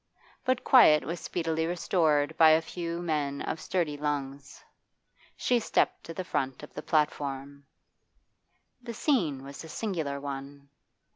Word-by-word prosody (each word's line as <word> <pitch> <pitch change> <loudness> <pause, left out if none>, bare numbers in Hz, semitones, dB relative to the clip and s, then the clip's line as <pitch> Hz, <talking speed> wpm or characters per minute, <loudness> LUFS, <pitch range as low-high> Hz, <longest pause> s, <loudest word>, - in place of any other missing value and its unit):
But 255 -1 0
quiet 155 - +6
was 170 +4 -4
speedily 160 -1 -2
restored 160 -4 +1
by 160 -1 +7
a 155 +1 +5
few 170 +1 -5
men 145 -4 -1
of 160 - -4
sturdy 165 -6 -1
lungs. 140 -2 -4 0.7
She 245 -1 +2
stepped - - 0
to 165 - -7
the 185 - -3
front 135 -6 -3
of 150 - -11
the - - -6
platform. 140 -2 -2 1.1
The 235 -2 -7
scene 170 - 0
was 140 +2 -9
a 160 - -10
singular 160 -9 -3
one. 140 0 -7
155 Hz, 140 wpm, -28 LUFS, 140-170 Hz, 1.1 s, by